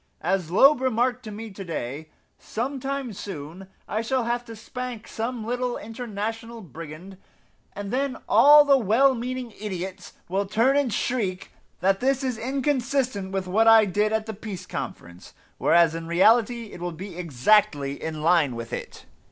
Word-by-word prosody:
As 185 -4 0
Loeb 270 - +5
remarked 250 0 +1
to 215 - -6
me 220 +1 -7
to 195 0 -8
day, 155 -2 -5 0.3
some 260 +5 -4
time 270 -3 -3
soon 185 -2 -8 0.2
I 215 - -1
shall 255 +2 0
have 240 +1 -1
to 230 -1 -9
spank 245 +1 -7
some 230 0 -4
little 245 +1 -2
international 225 0 -5
brigand, 165 - -10 0.6
and 205 +1 -6
then 270 0 -1
all 295 +1 +8
the 275 -2 +5
well 250 +5 +4
meaning 250 -1 -5
idiots 190 -2 -6
will 195 +2 -1
turn 230 +7 +2
and 285 -4 +2
shriek 205 -5 -2 0.3
that 195 +1 +2
this 270 +1 +1
is 250 -4 -2
inconsistent 260 -5 -1
with 195 -1 -2
what 215 +5 +2
I 225 -1 +8
did 210 +2 0
at 220 0 0
the 220 - -5
Peace 200 -3 -7
Conference, 85 +1 -8 0.2
whereas 170 -2 +4
in 165 0 -6
reality 225 +6 +3
it - - -10
will 175 -1 -3
be 185 +3 -8
exactly 145 - +2
in 155 -1 -4
line 160 -7 +3
with 115 0 -7
it." - - -7
215 Hz, 165 wpm, -25 LUFS, 185-245 Hz, 0.6 s, all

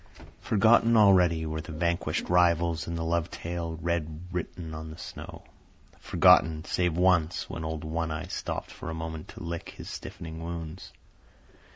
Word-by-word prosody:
Forgotten 115 +2 +4
already 90 -6 +5
were 80 0 -3
the 80 0 -8
vanquished 85 0 -1
rivals 85 -2 +3
and 85 0 -3
the 80 - -2
love 85 0 0
tale 85 -1 -4
red 80 -2 -2
written 85 -2 -5
on 80 0 -6
the 80 - -9
snow. - - -9 0.6
Forgotten, 80 +1 +4
save 90 -3 0
once, 90 -3 +2
when 80 - -5
old 80 -1 -4
One 80 +1 -2
Eye 75 0 -3
stopped - - -4
for - - -7
a 80 - -4
moment 80 -1 -5
to - - -10
lick 85 0 -5
his - - -9
stiffening 80 0 -7
wounds. 85 +1 -6
85 Hz, 160 wpm, -28 LUFS, 80-85 Hz, 0.6 s, already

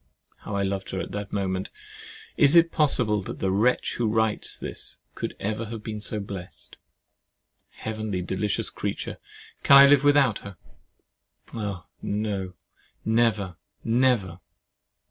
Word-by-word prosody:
How 100 - -6
I 100 - +1
loved 95 -1 -3
her 95 - -3
at - - -5
that 100 0 -5
moment! 95 -1 -2 0.7
Is 145 +3 +5
it 170 0 +6
possible 120 -8 +2
that - - -7
the 95 - 0
wretch 110 +6 +1
who 120 - +1
writes 110 0 0
this - - -5 0.2
could - - -5
ever 110 +3 -2
have 110 -1 -7
been 110 -1 -5
so 105 0 -3
blest! 100 -3 -8 0.9
Heavenly 110 -4 -4
delicious 95 +3 -1
creature! - - -4 0.4
Can 140 - +8
I 140 - +10
live 140 0 +5
without 145 -6 +4
her? 100 -2 -10 1.0
Oh! 100 -6 -4 0.2
no—never—never. 105 +1 -1
105 Hz, 125 wpm, -26 LUFS, 100-115 Hz, 1.0 s, I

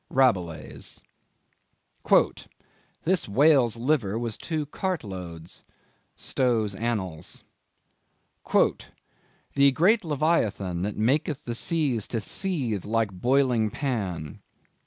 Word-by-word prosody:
—Rabelais. 85 - 0 2.1
"This 180 - +1
whale's 130 -1 +4
liver 120 -5 0
was 115 -2 -2
two 155 -3 -3
cartloads." 95 - -5 0.5
—Stowe's 115 -5 0
Annals. 95 -7 -3 2.1
"The 140 0 +5
great 195 - +3
Leviathan 130 - 0
that 100 +2 -3
maketh 135 +6 0
the 120 - -3
seas 135 -4 0
to 115 - -2
seethe 125 - -1
like 110 -1 0
boiling 125 +2 +2
pan." 95 - -3
115 Hz, 85 wpm, -26 LUFS, 100-145 Hz, 2.1 s, The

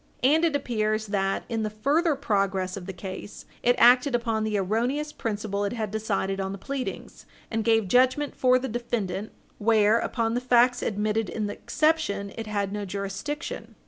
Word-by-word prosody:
And 305 +5 +4
it 325 -3 +2
appears 215 -5 0
that, 195 -2 -1
in 225 -1 -2
the 215 - -1
further 290 +9 +1
progress 195 -7 0
of 185 -3 -8
the - - -3
case, 190 +2 -8 0.2
it 245 0 +3
acted 250 +2 +6
upon 225 -2 0
the 215 -1 0
erroneous 240 +10 0
principle 205 -2 -3
it 200 - -1
had 220 -4 -3
decided 195 -3 -1
on 190 0 -3
the - - -6
pleadings, 270 +4 -6 0.2
and 225 -1 0
gave 225 -3 +3
judgment 255 +7 +3
for 255 -1 +4
the 260 +1 -3
defendant 220 -4 -3 0.3
where, 220 0 +4
upon 230 -2 -1
the 245 - 0
facts 245 0 +4
admitted 215 +1 -1
in 215 - -2
the 205 - -3
exception, 305 -11 0
it 225 -1 -6
had 200 -2 -2
no 210 0 -3
jurisdiction. 200 - -5
220 Hz, 175 wpm, -26 LUFS, 200-250 Hz, 0.3 s, acted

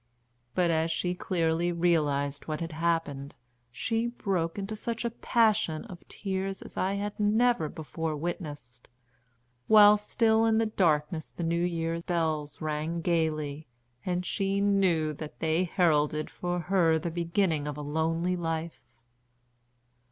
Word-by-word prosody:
But, 175 -2 +3
as 160 0 +1
she 175 +2 -1
clearly 170 -1 0
realised 150 -5 0
what 155 -1 -2
had 165 0 -4
happened, 160 -4 -1 0.4
she 225 - -1
broke 190 -8 -2
into 200 +2 -4
such 230 +2 -4
a 235 - 0
passion 215 -8 +1
of 185 -6 -11
tears 195 -1 -3
as - - -11
I 190 +1 0
had 205 +1 -4
never 210 -5 +2
before 160 -1 -4
witnessed, 145 -6 -6 0.8
while 210 -1 +8
still 220 +1 +2
in 220 -1 +3
the 225 - +3
darkness 160 -6 0
the 175 - -6
new 170 +1 +1
year 165 -1 -1
bells 160 -4 -2
rang 155 +2 -2
gaily, 155 -3 -1 0.4
and 180 0 -2
she 195 +1 0
knew 190 -6 +2
that 150 +1 -8
they 160 +3 +1
heralded 155 -4 +1
for 175 0 -3
her 170 -3 +3
the 165 +1 -3
beginning 170 -2 0
of 150 -1 -4
a - - -5
lonely 165 +4 0
life. 165 -1 -3
170 Hz, 140 wpm, -29 LUFS, 155-195 Hz, 0.8 s, while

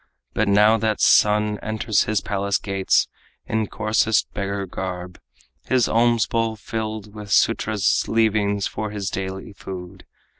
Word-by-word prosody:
But 110 - 0
now 105 +3 +5
that 110 -1 -1
son 105 0 +4
enters 110 -1 0
his 110 -2 0
palace 100 0 -1
gates 95 -2 +1 0.4
In 110 -1 -1
coarsest 110 0 +1
beggar 100 0 -3
garb, 90 -1 -6 0.5
his 130 -3 +2
alms 115 -1 +3
bowl 115 -1 -1
filled 110 -1 -5
With 105 -1 -9
Sudras' 105 -1 +2
leavings 105 -3 +1
for 110 0 -4
his 100 -2 -4
daily 95 +1 -5
food. 95 -1 -9
105 Hz, 135 wpm, -22 LUFS, 100-110 Hz, 0.5 s, now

